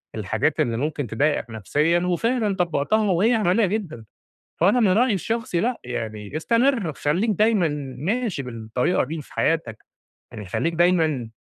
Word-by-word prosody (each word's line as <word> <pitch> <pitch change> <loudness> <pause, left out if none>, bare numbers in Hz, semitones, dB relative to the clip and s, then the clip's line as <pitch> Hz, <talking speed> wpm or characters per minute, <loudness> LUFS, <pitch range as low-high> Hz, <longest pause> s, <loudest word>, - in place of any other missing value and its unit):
الحاجات - - -1
اللي 115 -1 +1
ممكن 145 0 -2
تضايقك 130 +2 0
نفسيًا، 150 - +1
وفعلًا 210 +4 0
طبّقتها 185 +4 +1
وهي 210 +8 +3
عملية 210 0 +2
جدًا. 180 - -4 0.5
فأنا 200 +9 +4
من 220 - +4
رأيي 225 +5 +3
الشخصي 220 -2 -2
لأ 240 +5 -1
يعني 110 0 -5
استمر، 230 - +1
خليك 170 +12 0
دايمًا 210 -3 +3 0.3
ماشي 200 - -2
بالطريقة 120 +5 -1
دي 155 +3 -5
في - - -17
حياتَك، 155 -10 0 0.5
يعني 110 -4 -8
خليك 165 - -1
دايمًا 160 -8 +2
170 Hz, 140 wpm, -23 LUFS, 140-215 Hz, 0.5 s, فأنا